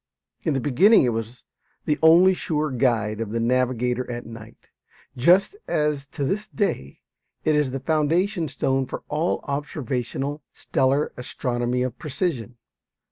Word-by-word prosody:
In 155 - 0
the - - +1
beginning 145 - +5
it 125 - +2
was 115 +2 -5 0.4
the 150 - 0
only 170 +4 +7
sure 155 -4 -2
guide 115 -4 0
of 110 - -3
the 115 +2 -2
navigator 125 +1 0
at 120 0 -5
night, 115 0 -12 0.5
just 180 - +4
as 150 -2 0
to 140 - -5
this 200 +10 -1
day 70 - -3 0.4
it 155 - +3
is 150 -3 +2
the 135 +1 -4
foundation 165 +5 +1
stone 135 -1 -1
for - - -6
all 155 +4 0
observational 140 0 -3
stellar 135 +3 0
astronomy 125 -2 -2
of 125 -1 -4
precision. 130 - -3
135 Hz, 140 wpm, -24 LUFS, 120-155 Hz, 0.5 s, only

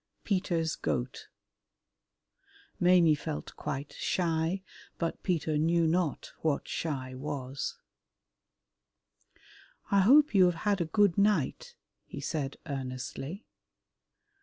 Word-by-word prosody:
Peter's 175 -5 0
Goat 125 +1 -3 1.5
Maimie 175 -3 +6
felt 75 - -5
quite 140 +2 -5
shy, 170 +1 0 0.3
but 165 -1 -2
Peter 160 -4 0
knew 165 +2 +3
not 165 -2 0
what 155 -3 0
shy 130 -5 -3
was. 135 -1 -4 2.1
"I 200 - +5
hope 275 +8 +6
you 190 -3 +7
have 170 -2 -2
had 200 -3 +2
a - - +1
good 200 +2 +3
night," 210 - +1 0.3
he - - -7
said 140 -4 -3
earnestly. 135 - -5
165 Hz, 100 wpm, -30 LUFS, 140-185 Hz, 2.1 s, you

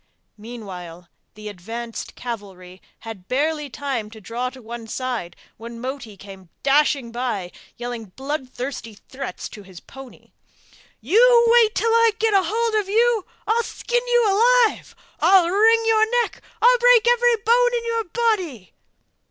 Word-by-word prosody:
Meanwhile 180 -7 -10 0.3
the 215 0 -10
advanced 225 +4 -7
cavalry 190 -6 -8 0.2
had 215 -5 -10
barely 300 +2 -1
time 240 -2 -4
to 220 0 -13
draw 235 +4 -4
to 260 +1 -14
one 235 -1 -9
side 245 -7 -4 0.2
when 230 +1 -9
Moti 250 -4 -7
came 190 -2 -13
dashing 280 -3 +2
by, 230 -7 -3 0.3
yelling 240 -2 -6
bloodthirsty 260 0 -6
threats 265 +5 -8
to 210 - -11
his 190 -3 -13
pony: 270 +4 -14 0.7
'You 470 - +5
wait 460 -2 +4
till 455 - +1
I 460 -1 +4
get 445 -1 +1
hold 440 +5 +1
of 390 - -12
you! 455 -1 +2 0.2
I'll 455 +2 +2
skin 485 +1 -2
you 485 -1 +3
alive! 470 +2 +2 0.2
I'll 375 -3 +5
wring 445 +5 +4
your 450 +2 +3
neck! - - -9 0.2
I'll - - +6
break 485 -1 +5
every 485 0 +4
bone - - +4
in 470 - -5
your 460 -1 -1
body! 360 - -2
270 Hz, 145 wpm, -22 LUFS, -, 0.7 s, I'll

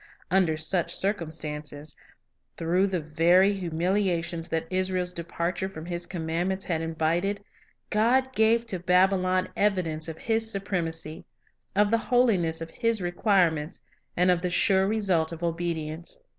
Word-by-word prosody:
Under 180 -4 +3
such 170 +2 0
circumstances, 155 -6 -3 0.6
through 180 +4 +2
the 190 -2 -1
very 170 +6 +4
humiliations 175 -1 -1
that 160 0 -1
Israel's 185 -1 -1
departure 170 +2 -3
from 160 -4 -9
His 175 0 -4
commandments 175 +3 -2
had 165 -3 -1
invited, 165 +5 -1 0.5
God 255 +5 +2
gave 225 +1 +3
to 195 -6 -3
Babylon 185 +1 +2
evidence 175 -6 0
of 160 -1 -6
His 225 +2 0
supremacy, 165 -6 -3 0.5
of 205 +1 +3
the 230 - +3
holiness 200 -11 +2
of 165 - -6
His 230 -2 0
requirements, 175 -4 +1 0.3
and 180 +1 +4
of 175 -2 +1
the 180 - -1
sure 190 +2 +3
result 190 -7 +1
of 165 0 -7
obedience. 165 - -3
180 Hz, 130 wpm, -27 LUFS, 165-195 Hz, 0.6 s, very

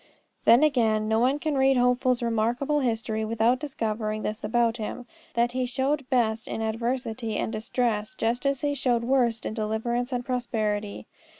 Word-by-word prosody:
Then, 235 +6 +7
again, 225 -7 +2
no 220 +1 +2
one 260 +4 +3
can 305 0 -2
read 265 0 +4
Hopeful's 250 0 +2
remarkable 235 +6 +1
history 225 -4 -1
without 230 +3 +2
discovering 215 -6 -3
this 215 +1 -3
about 230 +2 +1
him, 240 +3 -5 0.3
that 235 +1 +2
he 255 0 -1
showed 270 +2 -1
best 225 -3 +1
in - - -4
adversity 230 0 -2
and 220 - -2
distress, 220 0 -1
just 235 +1 -1
as 275 -2 0
he 290 -1 0
showed 245 -4 0
worst 240 -3 +1
in - - -3
deliverance 230 +3 -2
and 245 -1 -2
prosperity. 215 -5 -2
235 Hz, 165 wpm, -26 LUFS, 220-255 Hz, 0.3 s, Then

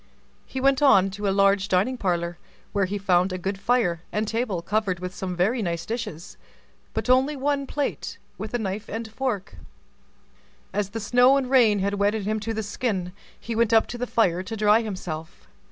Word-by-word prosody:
He 260 - -5
went 275 +1 +3
on 195 -9 +5
to 205 +1 -3
a - - +3
large 195 0 +3
dining 200 +7 +2
parlor, 175 -5 -2 0.3
where 200 -2 +2
he 200 +2 -3
found 185 -1 +2
a 185 - -2
good 190 +2 -3
fire, 195 -7 +1
and 210 +1 -1
table 220 -6 -2
covered 205 -3 0
with 180 0 -5
some 185 -1 -4
very 215 +8 +1
nice 170 -3 -2
dishes, 215 -8 -5 0.6
but - - -2
only 260 +4 +3
one 280 0 -1
plate 290 0 -3 0.2
with 215 +2 -5
a - - +3
knife 205 -1 -4
and 225 +1 -4
fork. 220 -4 -3 1.2
As 205 -2 -1
the 225 - -5
snow 245 +5 +5
and 265 -2 -2
rain 230 -6 +5
had 200 +1 0
wetted 205 +1 +1
him 215 +1 0
to 220 +2 -4
the 220 0 -2
skin, 200 -4 -2 0.3
he 230 - -5
went 230 0 +2
up 225 - +6
to 240 - -5
the 250 - -2
fire 185 -8 +2
to 220 +4 -6
dry 210 +2 +4
himself. 180 -7 -6
210 Hz, 195 wpm, -25 LUFS, 190-235 Hz, 1.2 s, up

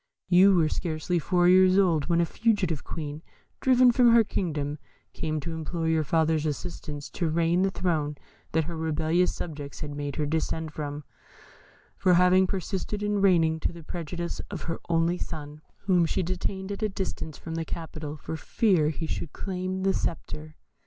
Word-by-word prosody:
You 190 +2 +7
were 165 -3 +4
scarcely 160 +2 -1
four 175 +2 +2
years 185 +1 +6
old 170 -7 +3
when 170 -1 +2
a - - +3
fugitive 195 -6 0
Queen, 150 -1 -5 0.4
driven 255 -1 +5
from 240 0 +5
her 230 -1 +7
kingdom, 150 -7 -2 0.3
came 155 -1 -2
to 165 +4 -5
implore 160 +1 -3
your 160 -1 +2
father's 160 0 +1
assistance 150 -1 -5
to 170 -3 -1
regain 170 +2 +2
the 195 - +3
throne 160 -6 -1 0.4
that 160 0 +3
her 170 +2 -5
rebellious 160 +2 +1
subjects 145 -4 -6
had 145 -1 -4
made 145 -1 -4
her 150 - -1
descend 160 0 -2
from, 145 -1 -5 0.9
for 180 -1 +4
having 180 +1 +5
persisted 195 +2 -3
in 205 -1 0
reigning 165 -5 +4
to - - -1
the 170 -1 -11
prejudice 170 +1 -5
of 195 -5 -6
her 165 0 -3
only 170 +1 +2
son, 150 -1 -6 0.2
whom 180 -4 +3
she 180 - 0
detained 190 +2 -3
at 200 - -5
a 215 - +1
distance 190 -5 -4
from 165 - -7
the 165 0 -2
capital, 155 -2 -6
for 160 - -6
fear 175 -2 +2
he 160 +1 -4
should 160 - -4
claim 185 0 -3
the 195 0 +3
sceptre. 155 -3 -4
165 Hz, 175 wpm, -27 LUFS, 155-185 Hz, 0.9 s, You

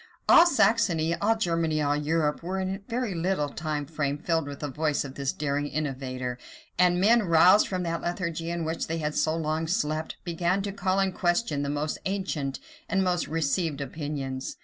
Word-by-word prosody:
All 340 - +8
Saxony, 200 - +3
all 210 +6 +2
Germany, 165 -5 0
all 145 -1 +1
Europe, 150 0 0
were 185 +3 -3
in 190 0 -1
a 195 - -5
very 240 -3 -1
little 165 -3 0
time 150 -1 -3
filled 150 +1 -1
with 140 -1 -7
the 150 - -2
voice 150 +1 -1
of 135 - -7
this 135 -1 -2
daring 145 0 -2
innovator; 130 -4 -3 0.4
and 180 0 +4
men, 230 +5 +5
roused 180 +2 +5
from 185 -2 -2
that 165 -1 -2
lethargy 170 -2 -3
in 170 -1 -2
which 160 +1 -2
they 165 - -2
had 150 -2 -2
so 160 +1 +1
long 160 0 -1
slept, 155 -2 -1
began 175 +3 0
to 200 - -3
call 195 -1 0
in 195 -1 +2
question 175 -4 0
the 140 - -2
most 150 +1 -2
ancient 175 -8 -2 0.3
and 195 -1 +2
most 180 -1 0
received 160 0 0
opinions. 140 -2 -4
165 Hz, 185 wpm, -27 LUFS, 145-185 Hz, 0.4 s, All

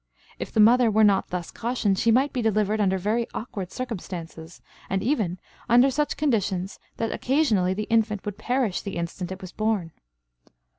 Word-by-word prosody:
If - - -5
the - - -1
mother 235 +2 +6
were 220 +1 +3
not 200 -2 +4
thus 180 -2 -5
cautioned, 230 -5 -1
she 230 - +2
might 265 +5 +3
be 250 - -1
delivered 215 -1 +1
under 190 -1 +2
very 215 +5 0
awkward 195 -6 -5
circumstances, 175 -8 -7 0.3
and 195 0 -1
even 215 - 0 0.3
under 245 +4 +6
such 295 +3 -1
conditions 200 -9 -1 0.2
that 225 - -1
occasionally 220 -10 +1
the 210 - -2
infant 220 -3 0
would 205 -1 -5
perish 245 -6 0
the 200 -3 -5
instant 170 +2 -4
it 190 - -7
was 185 -1 -8
born. 215 -6 -1
215 Hz, 170 wpm, -25 LUFS, 190-235 Hz, 0.3 s, mother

